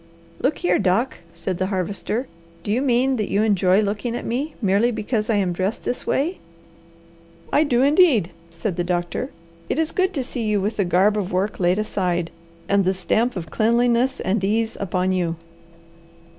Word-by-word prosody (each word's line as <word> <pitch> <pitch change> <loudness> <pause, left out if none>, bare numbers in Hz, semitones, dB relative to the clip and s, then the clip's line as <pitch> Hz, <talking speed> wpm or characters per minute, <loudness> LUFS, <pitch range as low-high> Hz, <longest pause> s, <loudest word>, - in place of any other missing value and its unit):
"Look 285 - 0
here, 175 0 +1
Doc," 200 +7 +1 0.2
said 175 +1 -4
the 185 - 0
Harvester, 200 +5 -2 0.4
"do 205 - -3
you 240 +4 +1
mean 260 0 +2
that 210 -3 -2
you 205 +2 +2
enjoy 195 -2 +3
looking 215 +3 -2
at - - -5
me 280 +6 -2
merely 205 +2 +2
because 220 -1 -2
I 225 - +3
am 190 -3 +1
dressed 190 +5 -2
this 245 - -3
way?" 330 +7 0 1.1
"I 295 - +5
do 255 -4 +2
indeed," 285 - +4 0.2
said 170 +2 -4
the 175 - +1
doctor. 175 +8 -2 0.4
"It - - 0
is 320 0 +1
good 375 0 +1
to 270 - 0
see 250 -1 -4
you 215 -2 +1
with 205 +3 -2
the 200 - +2
garb 195 +4 +3
of 195 -2 -3
work 190 +3 -1
laid 180 +1 +2
aside, 180 -5 -1 0.4
and 200 0 +3
the 190 +1 +1
stamp 220 +6 +1
of 170 -4 -6
cleanliness 235 +3 +2
and 195 +1 -1
ease 220 +3 0
upon 185 -1 0
you." 175 -3 0
210 Hz, 185 wpm, -22 LUFS, 185-240 Hz, 1.1 s, I